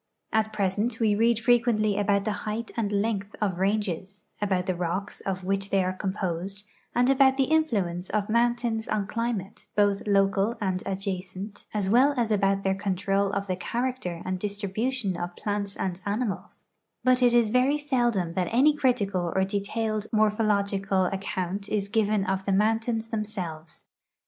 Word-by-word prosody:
At 220 0 +2
present 210 +3 -1
we 220 -3 +3
read 230 +2 +3
frequently 230 -3 +3
about 200 -1 +1
the 215 - +1 0.2
height 225 +2 -3
and 215 -3 -1
length 205 0 -1
of 190 -4 -1
ranges, 195 -1 -1 0.2
about 190 -3 +1
the 185 - 0
rocks 180 +3 -3
of 190 -1 -2
which 195 +1 -1
they 195 -2 +2
are 185 0 -1
composed, 190 0 -3 0.3
and 245 +1 +4
about 270 0 +5
the 270 - +4
influence 210 - 0
of 210 -1 0
mountains 235 0 +1
on 210 -2 0
climate, 220 -2 -3
both 205 0 +2
local 200 +2 +2
and 185 -3 -1
adjacent, 195 +1 -4
as 205 -3 -1
well 260 +7 +4
as 230 -2 +1
about 195 -1 +2
their 190 - +2
control 195 0 0
of 200 - -1
the 185 -2 -1
character 235 -4 -3
and 185 0 -2
distribution 205 +2 -2
of 175 0 -5
plants 205 -1 -3
and 185 -1 -3
animals, 205 0 -3 0.4
but 255 0 +4
it 245 -1 +5
is 235 -2 +4
very 255 +5 +3
seldom 240 - 0
that 180 +1 -1
any 280 +6 +5
critical 200 - +1
or 190 - +3
detailed 210 +2 -2
morphological 200 -3 +2
account 195 +1 -3
is 205 -2 0
given 210 -2 +1
of 190 0 -1
the 200 - 0
mountains 225 +2 +1
themselves. 185 -8 -5
205 Hz, 160 wpm, -27 LUFS, 190-225 Hz, 0.4 s, about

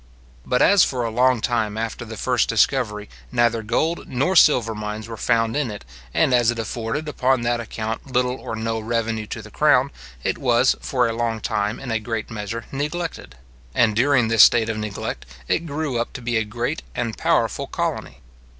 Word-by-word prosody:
But 125 - +2
as 200 -1 +6
for 125 -3 -1
a 115 - -2
long 125 0 +3
time 110 -3 -1
after 115 +1 -3
the 110 -1 -8
first 125 +1 +1
discovery 105 -2 +1 0.2
neither 120 -2 +2
gold 155 +10 -1
nor 140 +9 0
silver 125 -9 +5
mines 105 0 -5
were 115 - -6
found 115 0 +1
in 145 -4 0
it, 100 - -8 0.3
and 125 - +2
as 120 -2 +4
it 120 - 0
afforded 115 +6 -3
upon 130 -4 +1
that 120 0 0
account 115 +3 -5
little 125 0 +1
or 115 - -6
no 115 0 -2
revenue 110 -1 -2
to 115 - -6
the 110 - -12
crown, 140 -1 +3 0.3
it - - -1
was 125 -2 +3
for 125 -3 +1
a 115 - -2
long 115 -1 -1
time 105 +1 -2
in 130 -3 -6
a 110 - +1
great 115 0 -4
measure 115 +1 -5
neglected; 150 - -4 0.4
and 110 -2 +3
during 125 0 +3
this 115 -2 +5
state 115 0 +6
of 110 - -2
neglect, 105 - -5 0.2
it 170 - 0
grew 145 -4 -2
up 120 - -5
to 125 - -7
be 120 0 -1
a 110 - +2
great 120 +8 -3
and 115 -3 -2
powerful - - 0
colony. - - -4
115 Hz, 195 wpm, -22 LUFS, 110-130 Hz, 0.4 s, as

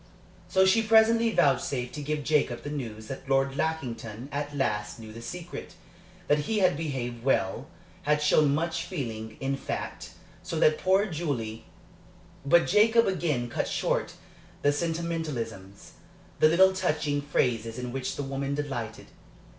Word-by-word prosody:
So 190 -1 +4
she 190 +4 +5
presently 225 +1 +5
vouchsafed 130 - +1
to 150 - -5
give 150 +1 -2
Jacob 140 -5 +1
the 145 - -5
news 115 -7 -5
that 135 +3 -8
Lord 135 0 +2
Lackington 130 -6 -3
at 145 0 -3
last 105 -6 -1
knew 110 -1 -10
the 115 - -9
secret 175 +8 -7 0.5
that 150 - +3
he 220 - +1
had 185 -7 +4
behaved 130 -6 -4
well 95 -8 +1 0.3
had 150 0 +2
shown 150 -1 +4
much 165 +2 -1
feeling, 110 - -5
in 135 +1 -1
fact - - -5 0.3
so 165 - -4
that 155 -1 +4
poor 190 +2 +3
Julie 140 - -3 0.8
But 170 +5 +5
Jacob 225 +4 +5
again 155 -10 0
cut 120 - -2
short - - -1 0.5
the 145 - +5
sentimentalisms, 145 - -4 0.5
the 155 - +6
little 190 +3 +5
touching 155 -6 0
phrases 115 -5 0
in 125 -1 -4
which 130 0 -3
the 145 - -3
woman 135 +1 -2
delighted. 130 -7 -4
145 Hz, 145 wpm, -28 LUFS, 120-165 Hz, 0.8 s, the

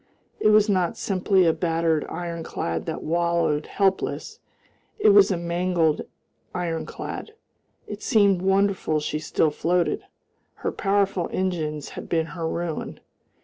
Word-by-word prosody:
It - - +3
was 215 0 +6
not 185 -4 +1
simply 190 -1 +2
a 165 - +4
battered 165 -2 0
ironclad 165 - -4
that - - -4
wallowed 170 -2 +1
helpless, 195 -1 -1 0.6
it 430 -1 +4
was 405 - +7
a 190 - 0
mangled 170 -2 +1 0.5
ironclad. 175 - -4 0.5
It 210 0 -7
seemed 200 -4 +3
wonderful 195 -4 +2
she 150 0 -3
still 155 0 +1
floated. 170 +3 0 0.6
Her - - +1
powerful 195 -3 0
engines 155 -6 -2
had - - -9
been 165 -2 +1
her 165 -2 -3
ruin. 170 -2 -4
175 Hz, 125 wpm, -24 LUFS, 165-195 Hz, 0.6 s, was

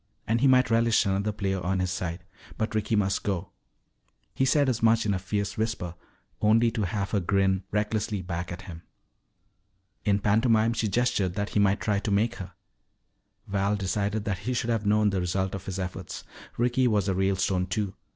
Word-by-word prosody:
And 115 +2 +1
he 140 - +5
might 130 -3 +4
relish 115 0 +3
another 100 +2 0
player 95 -2 -2
on 95 +1 0
his 90 -1 -1
side. 90 0 -4 0.3
But 110 0 -2
Ricky 110 +1 0
must 100 -2 +1
go. 95 -4 -3 0.8
He 135 - +1
said 140 +1 +3
as 125 -3 0
much 115 0 +4
in 105 - +1
a 95 - -1
fierce 100 +2 -3
whisper, 110 -6 -2 0.5
only 115 +2 +4
to 110 -4 -1
have 100 +2 -3
her 105 - +2
grin 95 0 +1
recklessly 105 -1 -1
back 85 0 -4
at 90 +2 -7
him. 85 -3 -9 1.2
In 100 -1 +2
pantomime 110 +2 +3
she 115 - -1
gestured 100 -4 0
that 100 0 -2
he - - 0
might 100 0 +3
try 105 -2 +1
to 105 - -3
make 110 +4 +1
her. 90 -1 -8 0.9
Val 100 +1 0
decided 100 +2 -1
that 100 -3 -2
he 125 +6 -3
should 120 0 0
have 110 -2 -1
known 105 0 +3
the 95 -2 0
result 95 +2 -1
of 95 -1 -6
his 95 -1 -3
efforts. 95 -1 -5 0.3
Ricky 125 +2 +2
was 105 -4 +1
a 95 - +1
Ralestone, 95 -1 +1
too. 100 0 -2
100 Hz, 190 wpm, -27 LUFS, 95-110 Hz, 1.2 s, he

